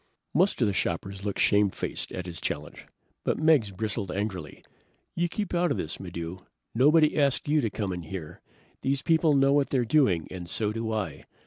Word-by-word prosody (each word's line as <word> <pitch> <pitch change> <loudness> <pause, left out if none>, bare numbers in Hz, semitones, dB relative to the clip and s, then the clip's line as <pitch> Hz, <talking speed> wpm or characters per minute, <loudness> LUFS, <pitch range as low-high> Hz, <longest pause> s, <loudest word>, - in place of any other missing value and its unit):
Most 185 +6 +3
of - - +3
the 100 - 0
shoppers 95 +2 -2
looked 100 -1 -2
shamefaced, 100 -2 +1
at 90 - -5
his 85 -2 -7
challenge, - - -5 0.4
but - - 0
Meggs 155 -9 +4
bristled 100 0 -3
angrily. 95 -6 -4 0.5
"You 175 0 0
keep 205 +1 -3
out 175 0 +2
of - - 0
this, 80 - -4
Maddox! 85 -1 -6 0.3
Nobody 150 +5 +5
asked 140 -2 +1
you 150 +1 +3
to 115 - 0
come 100 -3 -3
in 90 - -4
here! 80 -2 -8 0.4
These 135 +1 0
people 160 -2 +3
know 135 0 +4
what 145 -1 +2
they're 125 -3 +1
doing, 110 - +3
and 90 -2 -7
so 105 +2 -1
do 115 0 -3
I. 95 -10 -3
110 Hz, 190 wpm, -27 LUFS, 95-145 Hz, 0.5 s, Nobody